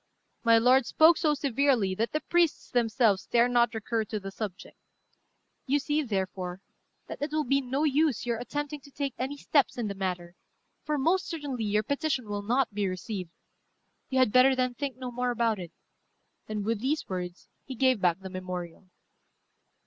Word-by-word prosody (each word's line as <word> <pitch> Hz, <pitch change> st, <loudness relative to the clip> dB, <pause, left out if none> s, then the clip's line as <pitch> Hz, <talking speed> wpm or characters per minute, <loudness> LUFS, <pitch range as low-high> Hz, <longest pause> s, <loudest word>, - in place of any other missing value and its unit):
My 230 Hz, -1 st, +6 dB
lord 250 Hz, +2 st, +4 dB
spoke 320 Hz, +6 st, +6 dB
so 300 Hz, -2 st, +2 dB
severely 270 Hz, -7 st, +1 dB
that 225 Hz, +5 st, -1 dB
the 305 Hz, -, -1 dB
priests 345 Hz, -3 st, +1 dB
themselves 225 Hz, -4 st, +2 dB
dare 240 Hz, 0 st, +4 dB
not 240 Hz, -1 st, +2 dB
recur 225 Hz, +1 st, -1 dB
to 215 Hz, -1 st, -4 dB
the 195 Hz, 0 st, -7 dB
subject. 195 Hz, -2 st, -7 dB, 0.9 s
You 280 Hz, +2 st, +3 dB
see, 295 Hz, +2 st, 0 dB
therefore, 190 Hz, -6 st, -3 dB, 0.5 s
that -, -, -8 dB
it 290 Hz, +1 st, -2 dB
will 310 Hz, 0 st, +1 dB
be 275 Hz, +1 st, +2 dB
no 265 Hz, +3 st, -1 dB
use 295 Hz, -4 st, +2 dB
your 235 Hz, -2 st, -1 dB
attempting 290 Hz, +4 st, -4 dB
to 280 Hz, -, -15 dB
take 280 Hz, -1 st, -3 dB
any 270 Hz, +3 st, -3 dB
steps 285 Hz, -2 st, +1 dB
in 235 Hz, -3 st, -2 dB
the -, -, -3 dB
matter, 180 Hz, -3 st, -4 dB, 0.5 s
for 300 Hz, -1 st, -1 dB
most 345 Hz, +7 st, +1 dB
certainly 285 Hz, -8 st, -4 dB
your 210 Hz, +1 st, +1 dB
petition 280 Hz, -1 st, -1 dB
will 205 Hz, 0 st, -3 dB
not 240 Hz, +2 st, 0 dB
be 205 Hz, -1 st, 0 dB
received. 185 Hz, 0 st, -5 dB, 0.8 s
You 265 Hz, -, -1 dB
had 255 Hz, -5 st, +4 dB
better, 260 Hz, +2 st, +6 dB
then, 255 Hz, -1 st, 0 dB
think 270 Hz, 0 st, -4 dB
no 255 Hz, -1 st, -5 dB
more 250 Hz, +1 st, -1 dB
about 230 Hz, -3 st, +1 dB
it." 175 Hz, -2 st, -7 dB, 0.8 s
And 210 Hz, -2 st, -3 dB
with 225 Hz, -1 st, 0 dB
these 295 Hz, +5 st, -1 dB
words 180 Hz, -1 st, -5 dB, 0.2 s
he 260 Hz, -, -7 dB
gave 255 Hz, -3 st, +2 dB
back 180 Hz, 0 st, +2 dB
the 190 Hz, -, -7 dB
memorial. 185 Hz, -1 st, -6 dB
245 Hz, 180 wpm, -28 LUFS, 205-275 Hz, 0.9 s, My